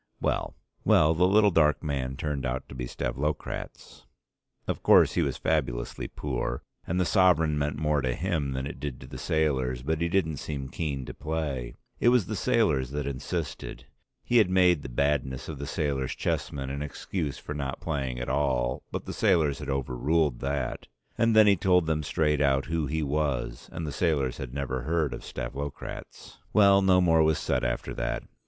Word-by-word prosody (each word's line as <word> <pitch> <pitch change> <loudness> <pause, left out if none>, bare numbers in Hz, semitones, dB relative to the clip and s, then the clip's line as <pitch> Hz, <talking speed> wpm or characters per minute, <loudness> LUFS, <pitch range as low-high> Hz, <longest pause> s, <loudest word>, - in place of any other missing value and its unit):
Well, - - -1 0.3
the 80 +4 +4
little 105 +1 +5
dark 75 -3 +3
man 65 -3 -2
turned 75 -4 -2
out 65 +1 -3
to - - -9
be 65 -1 -4
Stavlokratz. 70 +6 -4 0.6
Of - - -2
course - - +6
he - - +1
was - - -1
fabulously - - -1
poor, 60 -4 -3 0.2
and 90 +2 0
the 90 - +2
sovereign 85 -5 +4
meant 75 0 -1
more 75 -1 +1
to 65 -2 -1
him 80 -6 -1
than 65 0 -3
it 70 - -7
did 70 -4 -5
to - - -9
the - - -9
sailors, 65 -6 0
but 80 +3 -1
he 85 - +1
didn't 80 -5 +1
seem 70 -2 -5
keen 70 -4 -3
to - - -7
play, 75 -6 -3 0.2
it 120 - +5
was 120 -5 +4
the 110 - -4
sailors 95 - +2
that 75 0 -3
insisted; 70 +4 -4 0.4
he 120 - +2
had 105 -5 +5
made 90 -4 +4
the 65 - -7
badness 65 0 0
of 75 -4 -6
the 70 - -5
sailors' 70 -4 -1
chessmen 70 -2 -2
an 70 +1 -4
excuse 75 0 -4
for - - -6
not 70 -2 -4
playing 65 -3 -3
at 60 - -4
all, 65 -3 0
but - - -4
the - - -5
sailors 80 -9 +2
had - - -6
overruled 70 +2 0
that, 70 -1 -3 0.3
and 115 -1 +2
then 110 -1 +8
he 100 -1 +6
told 90 -1 +3
them 80 -1 0
straight 75 0 +1
out 70 -1 +2
who 80 -2 -1
he 80 +3 -1
was, 70 -4 -2
and 85 - -4
the 75 - -3
sailors 70 -6 0
had 65 -3 -6
never 65 -1 -3
heard 80 +1 0
of - - -7
Stavlokratz. 70 +1 -7
Well, 100 -2 +6
no 95 -1 +5
more 80 -2 +4
was 80 -1 +3
said - - -1
after 60 +1 -2
that. - - -2
75 Hz, 190 wpm, -28 LUFS, 65-80 Hz, 0.6 s, then